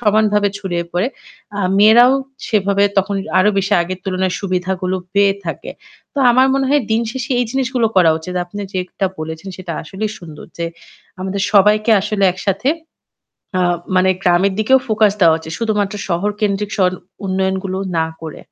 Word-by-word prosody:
সমানভাবে 210 -2 +2
ছড়িয়ে 175 -4 -3
পড়ে। 180 +6 +1 0.5
আ - - 0 0.2
মেয়েরাও 235 +5 +7 0.4
সেভাবে 200 -1 +2
তখন 195 +1 0 0.2
আরো 195 +3 +4
বেশি 195 +1 -1
আগের 180 +2 -5
তুলনায় 185 -1 -1
সুবিধাগুলো 185 -1 -2 0.2
পেয়ে 200 0 +4
থাকে। 165 - -5 0.4
তো - - -3
আমার 255 +2 +5
মনে 270 0 +1
হয় 290 -1 +3
দিন 225 +1 +2
শেষে 260 0 -5
এই - - +2
জিনিসগুলো 260 -3 0
করা 175 -3 +6
উচিত। 180 +3 -7
আপনি 205 +4 -8
যেটা 185 +1 -2
বলেছেন 160 +4 -6
সেটা 185 -2 -6
আসলেই 200 +6 -4
সুন্দর 160 -4 -11
যে 170 - -1 0.5
আমাদের 190 +1 -3
সবাইকে 210 +2 +4
আসলে 210 0 0
একসাথে 195 +5 -1 0.9
আ - - +2 0.3
মানে 185 +1 +4
গ্রামের 180 +2 +3
দিকেও 260 +5 +4
ফোকাস 215 -2 +3
দেওয়া 165 -2 +6
উচিত। 160 0 -8
শুধুমাত্র 210 -2 -1
শহর 175 +4 0
কেন্দ্রিক 205 0 0
শর 185 -2 +3 0.3
উন্নয়ন 190 0 0
গুলো 190 0 -3 0.2
না 160 - +1 0.2
করে। 160 -2 -8
195 Hz, 160 wpm, -17 LUFS, 185-215 Hz, 0.9 s, মেয়েরাও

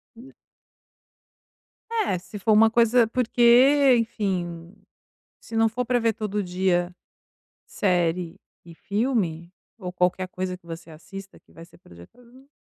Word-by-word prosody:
Hum. 245 +4 -14 1.6
É, 440 - 0
se 200 +3 -10
for 210 +2 0
uma 220 +1 +6
coisa 235 +1 +3
porque 250 +3 +4
enfim, 180 -6 -3 0.7
se 225 - -8
não 225 0 +4
for 245 +3 -3
para 245 0 +1
ver 230 -1 +1
todo 210 -1 -3
dia, 180 -1 -1 0.7
série 175 -2 -1 0.3
e 170 -1 -13
filme, 200 -5 -2 0.3
ou 180 -4 -6
qualquer 180 +1 0
coisa 185 0 -4
que 180 -2 -26
você 165 0 -9
assista 195 +5 -11
que - - -27
vai 165 - -12
ser 170 - -21
projetada 85 - -17
ali 260 +3 -20
195 Hz, 140 wpm, -24 LUFS, 175-235 Hz, 1.6 s, uma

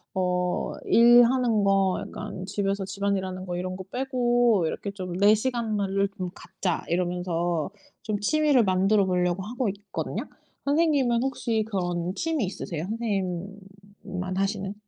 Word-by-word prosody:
어 180 -1 0
일하는 240 -2 +5
거 195 -1 +3
약간 185 - -7
집에서 200 0 -1
집안일하는 190 -1 -2
거 175 -1 -3
이런 185 +1 -3
거 190 - -7
빼고 245 -5 +2
이렇게 200 +5 -3
좀 185 -3 -6
'내 205 +2 +6
시간으 225 -2 -1
를 195 +1 +1 0.3
갖자.' 180 -3 -3
이러면서 175 -2 -1 0.3
좀 210 -1 -2
취미를 295 +2 +3
만들어 195 +1 +3
보려고 180 0 0
하고 240 +2 -2
있거든요. 200 +1 -4 0.4
선생님은 280 -5 +2
혹시 235 -4 0
그런 175 -3 -2
취미 320 -6 0
있으세요 170 -3 -5
선생님만 195 -2 -5
하시는? 195 0 -1
200 Hz, 295 characters per minute, -26 LUFS, 185-230 Hz, 0.4 s, 내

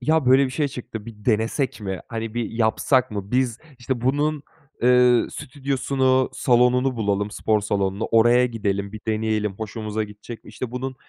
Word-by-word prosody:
ya, 155 +1 +1
böyle 130 +2 +6
bir - - -6
şey 145 +2 -1
çıktı, 115 -4 -8
bir 105 -2 -11
denesek 115 +2 0
mi? 95 -3 -4
Hani, 115 -1 -5
bir 120 -1 -2
yapsak 115 +3 +1
mı? 100 -1 -5
Biz, 125 -2 +1 0.2
işte 120 0 -3
bunun, 145 +4 0 0.4
eee, 125 -1 +5
stüdyosunu, 130 -1 0
salonunu 125 +1 +2
bulalım, 105 -1 -1
spor 105 +1 0
salonunu 100 0 -1
oraya 120 +2 +5
gidelim, 100 -3 -2
bir 110 - -8
deneyelim, 110 -1 0
hoşumuza 110 +1 -4
gidecek 105 +3 -11
mi? - - -14
İşte, 115 +3 -6
bunun 130 +1 -4
115 Hz, 160 wpm, -23 LUFS, 105-130 Hz, 0.4 s, böyle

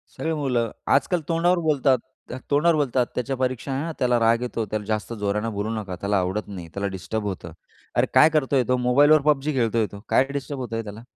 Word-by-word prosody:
सगळी 160 0 -2
मुलं 125 -7 0 0.2
आजकाल 170 +4 +1
तोंडावर 175 +2 +2
बोलतात, 140 -4 +3 0.4
अक 130 - -7
तोंडावर 160 +4 +4
बोलतात, 130 -4 +1
"त्याच्या 130 +2 -2
परीक्षा 130 +1 -2
आहे 135 +2 -1
ना, 165 - -3
त्याला 125 -1 +2
राग 115 +1 +3
येतो, 120 -2 -2
त्याला 105 -1 -2
जास्त 110 0 -2
जोराने 105 +1 -1
बोलू 105 +2 -2
नका, 100 -4 -5
त्याला 100 0 +1
आवडत 95 +4 -2
नाही, 90 -4 -8
त्याला 100 0 -2
डिस्टर्ब 110 +4 -4
होतं." 90 -4 -5 0.4
अरे - - +3
काय 155 - +7
करतोय 140 -4 +2
तो 125 - +2
मोबाईलवर 145 +4 +5
PUBG 150 0 +2
खेळतोय 115 -3 +1
तो, 100 - -9
काय 130 - +4
डिस्टर्ब 140 0 -4
होतंय 115 -2 -4
त्याला? 105 +1 -9
125 Hz, 205 wpm, -24 LUFS, 110-145 Hz, 0.4 s, काय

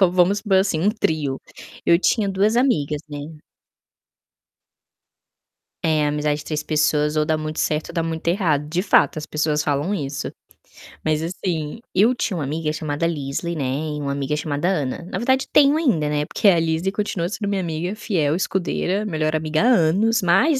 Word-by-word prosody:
Vamos 185 +3 +4
supor, 200 -2 +2
assim, 190 -5 0
um 190 +6 +3
trio, 155 - -1 0.5
eu 170 0 +5
tinha 205 +1 +1
2 200 +3 +2
amigas, 155 - +1
né? 145 -1 -6 2.6
É, 155 -2 +2
amizade 150 0 0
de 150 - -9
3 150 -1 -2
pessoas 150 -1 +1
ou 155 0 +2
dá 155 - +1
muito 155 0 -5
certo 155 0 -1
ou - - -11
dá 165 - 0
muito 165 0 -4
errado. 165 -6 +1
De 170 +3 0
fato, 185 - +3
as 155 - -6
pessoas 150 0 0
falam 145 +7 -1
isso. 140 -5 -3 0.8
Mas, 155 -1 +1
assim, 165 0 -3
eu 220 +7 +4
tinha 205 -5 -2
uma 155 - -2
amiga 155 +2 -2
chamada 155 0 -2
Lizzie, 160 +1 -2
né. 150 - -2 0.3
E - - -4
uma 140 -1 -2
amiga 140 +1 -2
chamada 150 +2 -2
Ana 150 -5 -2
na - - -2
verdade, 260 +2 +1
tenho 285 0 +5
ainda, 230 - +1
né, 150 0 0
porque 210 - 0
a 180 -4 +6
Lizzie 165 +3 0
continua 200 -4 -2
sendo 205 0 -4
minha 200 -1 0
amiga 170 +3 -3
fiel, 165 -9 0
escudeira, 190 +2 -1
melhor 155 -5 -1
amiga 155 0 0
há - - +2
anos, 220 +1 +3
mais 260 - +3
160 Hz, 180 wpm, -22 LUFS, 150-195 Hz, 2.6 s, a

